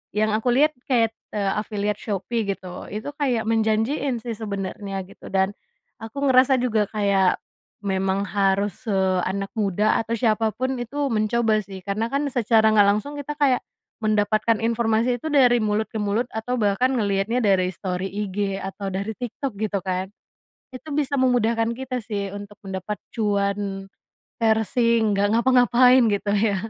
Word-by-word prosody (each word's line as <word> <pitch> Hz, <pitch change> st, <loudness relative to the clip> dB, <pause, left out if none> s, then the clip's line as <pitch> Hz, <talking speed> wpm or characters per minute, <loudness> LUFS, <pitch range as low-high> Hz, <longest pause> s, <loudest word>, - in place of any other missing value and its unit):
yang 215 Hz, 0 st, +2 dB
aku 225 Hz, +3 st, 0 dB
liat 300 Hz, +4 st, +4 dB, 0.2 s
kayak, 230 Hz, -3 st, +2 dB, 0.2 s
eee, 200 Hz, -2 st, 0 dB
affiliate 210 Hz, -1 st, -3 dB
Shopee, 215 Hz, +3 st, -2 dB
gitu. 185 Hz, -2 st, -5 dB
Itu 215 Hz, +8 st, -5 dB
kayak 255 Hz, -7 st, 0 dB
menjanjiin 225 Hz, +4 st, +1 dB
sih 235 Hz, -, -3 dB
sebenernya 195 Hz, -2 st, -4 dB
gitu 195 Hz, -, -14 dB
dan 190 Hz, +1 st, +1 dB, 0.5 s
aku 280 Hz, +6 st, -3 dB
ngerasa 260 Hz, +1 st, +5 dB
juga 220 Hz, -5 st, +1 dB
kayak, 200 Hz, -3 st, +2 dB, 0.5 s
memang 190 Hz, 0 st, 0 dB
harus 195 Hz, +1 st, +1 dB
se 210 Hz, -, 0 dB, 0.3 s
anak 195 Hz, +1 st, -2 dB
muda, 210 Hz, 0 st, +2 dB
atau 225 Hz, +1 st, -4 dB
siapa 220 Hz, 0 st, +2 dB
pun 260 Hz, +1 st, -1 dB
itu 280 Hz, +5 st, -2 dB
mencoba 220 Hz, 0 st, +2 dB
sih. 195 Hz, 0 st, -9 dB
Karena 215 Hz, +3 st, -1 dB
kan 280 Hz, +1 st, 0 dB
secara 220 Hz, -2 st, +4 dB
nggak 205 Hz, -2 st, +6 dB
langsung 210 Hz, +8 st, 0 dB
kita 290 Hz, +1 st, -4 dB
kayak, 270 Hz, -4 st, +3 dB, 0.4 s
mendapatkan 215 Hz, +1 st, +2 dB
informasi 230 Hz, +1 st, +1 dB
itu -, -, -4 dB
dari 250 Hz, -4 st, +5 dB
mulut 215 Hz, +1 st, +1 dB
ke 225 Hz, -, -4 dB
mulut, 210 Hz, +4 st, 0 dB
atau 235 Hz, +3 st, -2 dB
bahkan 210 Hz, +4 st, +2 dB
ngeliatnya 205 Hz, +1 st, 0 dB
dari 185 Hz, -2 st, +3 dB
story 185 Hz, +1 st, -3 dB
IG 200 Hz, -1 st, -2 dB
atau 195 Hz, +1 st, -5 dB
dari 200 Hz, +3 st, -3 dB
TikTok, 250 Hz, +2 st, -4 dB
gitu 210 Hz, -2 st, -1 dB
kan. 185 Hz, 0 st, -2 dB, 0.6 s
Itu 255 Hz, +5 st, -9 dB
bisa 290 Hz, -1 st, 0 dB
memudahkan 230 Hz, -3 st, +2 dB
kita 255 Hz, -1 st, -3 dB
sih, 200 Hz, -3 st, -3 dB
untuk 205 Hz, 0 st, -9 dB
mendapat 190 Hz, +2 st, -4 dB, 0.2 s
cuan 200 Hz, -2 st, -1 dB, 0.5 s
parsing, 225 Hz, 0 st, +2 dB
nggak 200 Hz, +1 st, +2 dB
ngapa-ngapain, 250 Hz, 0 st, +5 dB
gitu 205 Hz, 0 st, -1 dB
ya. 205 Hz, -1 st, +2 dB
215 Hz, 155 wpm, -23 LUFS, 200-240 Hz, 0.6 s, nggak